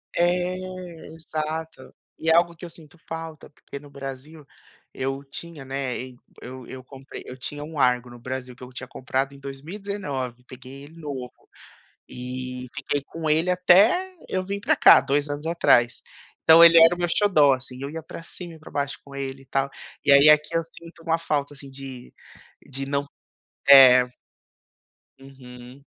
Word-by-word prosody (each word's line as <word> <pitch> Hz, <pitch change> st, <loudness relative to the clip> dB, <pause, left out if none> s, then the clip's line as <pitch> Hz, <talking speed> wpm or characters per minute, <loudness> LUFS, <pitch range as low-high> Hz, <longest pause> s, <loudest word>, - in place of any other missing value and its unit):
É, 180 Hz, +1 st, +1 dB, 0.5 s
exato. 160 Hz, 0 st, -6 dB, 0.3 s
E 160 Hz, -, -1 dB
é -, -, +6 dB
algo 170 Hz, 0 st, +3 dB
que 175 Hz, +2 st, -10 dB
eu -, -, -8 dB
sinto 165 Hz, 0 st, -17 dB
falta, 165 Hz, -1 st, -7 dB
porque 140 Hz, -1 st, -11 dB
no 145 Hz, 0 st, -15 dB
Brasil 140 Hz, +2 st, -9 dB, 0.5 s
eu 135 Hz, +1 st, -3 dB
tinha, 150 Hz, +2 st, -10 dB
né, 135 Hz, -1 st, -3 dB
ei 130 Hz, 0 st, -7 dB, 0.3 s
eu 130 Hz, 0 st, -9 dB
eu 130 Hz, 0 st, -10 dB
comprei, 135 Hz, +1 st, -11 dB
eu 125 Hz, -, -9 dB
tinha 145 Hz, +3 st, -6 dB
um 155 Hz, +1 st, -9 dB
Argo 125 Hz, -1 st, +2 dB
no 120 Hz, -, -12 dB
Brasil 130 Hz, 0 st, -6 dB
que 125 Hz, -, -14 dB
eu 125 Hz, -, -11 dB
tinha 130 Hz, 0 st, -8 dB
comprado 130 Hz, +2 st, -3 dB
em 140 Hz, -, -14 dB
2019, 140 Hz, -, -6 dB
peguei 130 Hz, +2 st, -12 dB
ele 160 Hz, +3 st, -16 dB
novo 135 Hz, -5 st, -6 dB, 0.8 s
e 125 Hz, 0 st, -7 dB
fiquei 145 Hz, 0 st, -2 dB
com 160 Hz, 0 st, -5 dB
ele 160 Hz, +4 st, +2 dB
até 200 Hz, -, +4 dB
eu 185 Hz, 0 st, -2 dB
vim 200 Hz, +1 st, -4 dB
pra -, -, +2 dB
cá, 130 Hz, -, +8 dB
2 145 Hz, +2 st, -1 dB
anos 145 Hz, +2 st, -5 dB
atrás. 120 Hz, -8 st, +3 dB, 0.4 s
Então 165 Hz, +1 st, +8 dB
ele 170 Hz, 0 st, +8 dB
era 165 Hz, +1 st, +8 dB
o -, -, -5 dB
meu 175 Hz, 0 st, 0 dB
xodó, 155 Hz, -9 st, +4 dB
assim, 130 Hz, 0 st, -7 dB
eu 140 Hz, -, -4 dB
ia 160 Hz, +1 st, -7 dB
pra 165 Hz, -, -9 dB
cima 170 Hz, 0 st, -9 dB
e 160 Hz, -, -16 dB
pra 155 Hz, -, -13 dB
baixo 140 Hz, 0 st, -3 dB
com 140 Hz, 0 st, -13 dB
ele 135 Hz, 0 st, -6 dB
e -, -, -23 dB
tal, 135 Hz, +1 st, -1 dB, 0.4 s
e 145 Hz, -, +4 dB
aí 140 Hz, +2 st, +8 dB
aqui 150 Hz, 0 st, +5 dB
eu 165 Hz, -, +2 dB
sinto 165 Hz, 0 st, -15 dB
uma 165 Hz, 0 st, 0 dB
falta 150 Hz, -3 st, -2 dB
assim 140 Hz, -1 st, -11 dB
de, 135 Hz, -2 st, -10 dB, 0.5 s
de 135 Hz, 0 st, -4 dB
não 140 Hz, 0 st, -2 dB, 0.6 s
é. 125 Hz, -2 st, +9 dB, 1.1 s
Uhum. 130 Hz, -1 st, -14 dB
140 Hz, 180 wpm, -24 LUFS, 130-165 Hz, 1.1 s, é